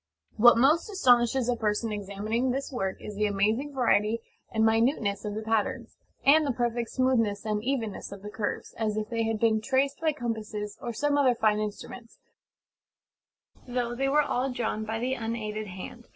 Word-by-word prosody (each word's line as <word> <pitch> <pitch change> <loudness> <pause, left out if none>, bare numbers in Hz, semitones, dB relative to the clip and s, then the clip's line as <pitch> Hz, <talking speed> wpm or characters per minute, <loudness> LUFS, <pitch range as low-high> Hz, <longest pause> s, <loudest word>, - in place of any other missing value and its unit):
What 240 +2 +7
most 300 - +3
astonishes 250 - +3
a 245 - +2
person 220 0 -1
examining 210 +4 -2
this 270 +3 -2
work 195 -7 -2
is 210 - -7
the 210 +1 0
amazing 215 +8 0
variety 225 -3 +2 0.3
and 220 0 +2
minuteness 225 -2 +1
of 205 -1 -3
the 220 - -4
patterns, 220 -1 -1 0.3
and 310 +3 +6
the 285 - 0
perfect 240 -1 -1
smoothness 230 -6 +1
and 210 -1 -1
evenness 235 -8 -3
of 200 -1 -9
the 210 - -7
curves, 210 - -4
as 215 -1 -1
if 215 0 -3
they 230 -1 -1
had 225 -1 -1
been 220 -1 +2
traced 270 +4 0
by 320 -1 +2
compasses 220 -6 -5
or 240 - -3
some 290 +5 +1
other 255 -3 +4
fine 215 -2 +2
instruments; 215 +3 -6 1.5
though 245 -1 -2
they 270 +3 0
were 300 +2 +4
all 260 -1 -1
drawn 220 -3 -2
by 220 +1 -3
the 250 +3 -1
unaided 220 -3 -4
hand. 190 +6 -9
230 Hz, 180 wpm, -28 LUFS, 215-255 Hz, 1.5 s, What